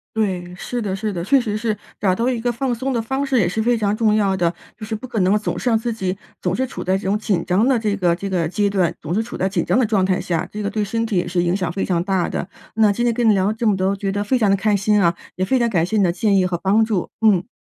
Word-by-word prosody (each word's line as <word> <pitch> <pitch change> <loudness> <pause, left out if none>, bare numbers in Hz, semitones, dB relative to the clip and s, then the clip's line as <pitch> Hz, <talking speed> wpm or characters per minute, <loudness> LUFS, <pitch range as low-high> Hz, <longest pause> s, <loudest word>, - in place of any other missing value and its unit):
对， 185 -5 -1
是 240 +6 -4
的 195 -2 -2
是 210 +1 -3
的。 170 -2 -3
确 275 +7 +4
实 215 -4 -2
是 215 -1 -1 0.2
找 190 -3 +2
到 230 +5 0
一 250 -2 0
个 240 +1 0
放 245 +1 -1
松 260 +3 -2
的 240 - 0
方 265 +5 -2
式 270 -2 +1
也 180 - +2
是 220 +5 -1
非 240 +1 +2
常 210 -1 0
重 215 -2 +2
要 200 -3 +2
的， 175 -2 +1 0.2
就 215 - -12
是 220 0 -3
不 255 +4 -7
可 230 -3 -2
能 190 +3 +3
总 210 - -3
是 250 - 0
让 225 - +3
自 230 +1 -2
己 190 -3 -3 0.2
总 180 0 0
是 260 - 0
处 260 - -7
在 185 +1 +1
这 200 - -8
种 195 +2 +1
紧 195 -6 -1
张 195 +7 +2
的 265 -2 +3
这 215 -3 0
个 175 -3 +2
这 195 +3 -5
个 175 -4 0
阶 205 +4 0
段， 185 -4 +1
总 155 +2 -4
是 215 - +1
处 235 - -7
在 190 - 0
紧 195 - -1
张 - - +1
的 255 - +3
状 210 -3 +1
态 185 -1 +1
下， 170 -1 -2
这 210 0 -5
个 200 - -1
对 215 -2 -1
身 225 +3 -1
体 215 -4 -1
也 175 - 0
是 175 0 0
影 175 +1 +1
响 180 -3 -2
非 195 - -2
常 175 -2 0
大 190 -2 0
的。 - - -4 0.3
那 220 -2 +4
今 240 +4 -1
天 235 - +2
跟 235 -1 +2
你 215 - +6
聊 190 0 +2
了 215 - +1
这 225 +1 -1
么 210 - +3
多， 190 +1 +1
觉 195 0 -2
得 205 +1 -1
非 255 +4 +1
常 210 -4 +3
地 195 - +4
开 205 +2 +1
心 205 +1 +2
啊， 170 -2 +3 0.2
也 185 +1 -1
非 260 +6 +2
常 235 -1 +2
感 170 -5 +1
谢 220 +4 -1
你 200 - +4
的 175 - +3
建 205 +2 +1
议 185 -1 +3
和 175 -1 -2
帮 200 +5 +2
助， 210 -5 -1
嗯。 205 -3 +3
205 Hz, 350 characters per minute, -20 LUFS, 185-225 Hz, 0.3 s, 你